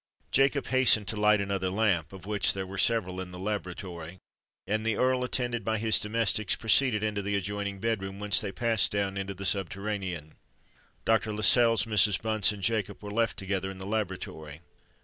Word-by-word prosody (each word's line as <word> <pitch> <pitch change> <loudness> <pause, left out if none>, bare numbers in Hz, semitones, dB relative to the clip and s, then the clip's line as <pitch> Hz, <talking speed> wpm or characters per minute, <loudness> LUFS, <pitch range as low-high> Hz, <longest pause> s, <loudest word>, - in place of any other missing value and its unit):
Jacob 135 +1 +2
hastened 130 -5 +3
to - - -1
light 105 0 +4
another 100 -2 -1
lamp 95 -5 0
(of 95 -1 -11
which 105 -2 +1
there 95 -1 -4
were 95 0 -7
several 95 -6 +1
in 90 - -7
the 90 - -10
laboratory); 90 -3 -5 0.5
and 110 +1 -1
the 115 -1 0
Earl, 130 0 +2
attended 120 -2 -2
by 110 0 0
his 110 0 +2
domestics, 110 -2 0
proceeded 115 -1 +3
into 105 -1 -1
the 100 +1 -2
adjoining 100 0 -3
bed 110 0 -1
room, 95 0 -6
whence 105 -2 +2
they 105 -2 -4
passed 115 +1 +1
down 100 -1 -1
into 95 0 -4
the 100 +1 -7
subterranean. 95 -4 -3 0.7
Dr. 110 -1 +2
Lascelles, 115 +1 +4
Mrs. 105 -3 +3
Bunce, 110 -2 +2
and 100 -2 -8
Jacob 105 -3 -1
were 105 - -6
left 115 +1 0
together 95 -1 -2
in 95 - -8
the 95 - -8
laboratory. 90 -7 -4
105 Hz, 185 wpm, -28 LUFS, 95-110 Hz, 0.7 s, light